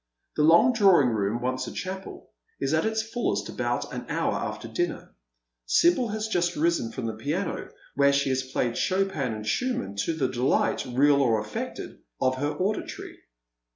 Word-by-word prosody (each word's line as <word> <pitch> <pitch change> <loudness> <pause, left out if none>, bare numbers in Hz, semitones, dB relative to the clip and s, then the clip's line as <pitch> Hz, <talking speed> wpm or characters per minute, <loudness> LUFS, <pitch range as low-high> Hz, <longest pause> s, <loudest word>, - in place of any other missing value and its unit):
The - - +1
long 170 +11 +6
drawing 190 - +5
room, 110 +1 -1
once 130 0 -1
a - - -5
chapel, 190 +1 -7 0.3
is 135 +2 -1
at 160 +7 +2
its 220 0 0
fullest 230 +2 -2
about - - -2
an - - -6
hour - - 0
after - - -4
dinner. 350 0 -3 0.5
Sibyl 335 -8 +4
has 215 0 -3
just 175 -4 0
risen 160 -7 +1
from 125 - -5
the 110 - -2
piano, 150 - -3 0.2
where 140 0 +4
ehe 140 0 +1
has 130 0 +1
played 120 -2 0
Chopin 185 -9 0
and 110 -1 -6
Schumann 110 - -1
to 165 - 0
the 145 -5 0
delight, 125 +1 +1
real 140 +3 +4
or 115 -5 +3
affected, 105 0 -6 0.2
of 130 0 +1
her 145 +2 0
auditoiy. 200 +3 -3
145 Hz, 170 wpm, -26 LUFS, 125-195 Hz, 0.5 s, long